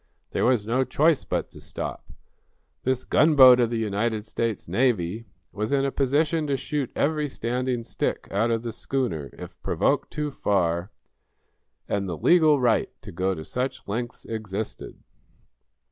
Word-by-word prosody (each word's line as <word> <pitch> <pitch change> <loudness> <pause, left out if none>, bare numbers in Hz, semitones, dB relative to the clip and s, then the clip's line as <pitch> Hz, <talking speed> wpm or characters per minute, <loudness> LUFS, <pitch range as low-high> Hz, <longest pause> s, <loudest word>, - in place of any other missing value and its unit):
There - - 0
was 120 -4 +2
no 125 +4 +1
choice 150 +4 +2
but - - -2
to - - -13
stop. - - -6 0.7
This 130 0 0
gunboat 135 -5 +7
of 120 -2 +3
the 115 - -2
United 110 0 -1
States 115 -1 -3
Navy 110 0 0 0.2
was 105 +3 -3
in 140 -1 +2
a 135 - 0
position 150 +4 +1
to 140 -1 0
shoot 145 -2 -3
every 150 0 +1
standing 125 -1 -2
stick 115 - -3
out 110 +4 +1
of 115 0 0
the 120 - -3
schooner, 105 - -2
if - - -11
provoked - - 0
too 150 -1 -3
far, 90 -6 0 1.0
and 100 -2 -1
the 85 - -3
legal 155 - +5
right 120 -3 +2
to 105 - -8
go 95 +2 -1
to 80 - -7
such 125 +2 -3
lengths 120 +4 -4
existed. 110 -1 -6
120 Hz, 155 wpm, -25 LUFS, 105-135 Hz, 1.0 s, gunboat